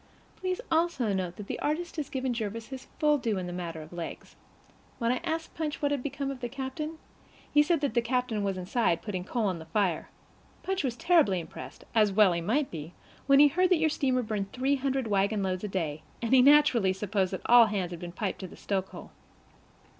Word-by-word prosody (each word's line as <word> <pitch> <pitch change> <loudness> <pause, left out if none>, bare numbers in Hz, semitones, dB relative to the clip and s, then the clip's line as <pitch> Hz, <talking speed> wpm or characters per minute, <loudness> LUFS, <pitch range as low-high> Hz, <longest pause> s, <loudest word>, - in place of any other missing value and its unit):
Please 370 -1 -3
also 320 -10 +1
note 180 -2 -2
that 210 - -8
the - - -5
artist 330 +3 -2
has 300 -3 -3
given 260 -2 -2
Jervis 225 0 -4
his 265 -1 -8
full 300 -1 +3
due 225 -5 -1
in 185 - -3
the 175 - -5
matter 170 -3 -5
of 155 - -14
legs. 170 -1 -7 0.6
When 230 -1 +1
I 250 - +1
asked 325 -1 -3
Punch 310 -2 -3
what 285 -1 0
had 285 -3 0
become 275 0 -3
of 270 - -7
the 245 -1 -4
captain, 275 +5 -5 0.6
he 295 - +7
said 325 0 +2
that 285 -6 0
the 235 - +3
captain 245 -2 -1
was 195 -1 -1
inside, 185 -1 0
putting 190 -4 -3
coal 230 +3 -1
on 185 -4 -1
the 160 - -9
fire. 185 -4 0 0.5
Punch 385 -2 -1
was 250 -4 -1
terribly 265 - +3
impressed, 145 -5 -9
as 215 -3 +4
well 195 -2 +5
he 170 - -2
might 265 - 0
be, 160 +1 -7 0.3
when 275 0 +6
he 290 +1 +8
heard 360 +5 +2
that 365 - +5
your 315 -1 +2
steamer 255 -4 +1
burned 205 -3 -3
three 270 +2 +1
hundred 270 -1 -1
wagonloads 195 -2 0
a - - -1
day, 160 -6 -3 0.2
and 235 +1 -1
he 260 - +8
naturally 260 -8 +5
supposed 190 -1 -1
that 190 - -4
all 240 -1 +7
hands 195 -4 -2
had 170 - -6
been 175 0 -7
piped 195 +2 -3
to 190 - -6
the - - -13
stokehole. 190 -1 -4
230 Hz, 220 wpm, -29 LUFS, 190-280 Hz, 0.6 s, he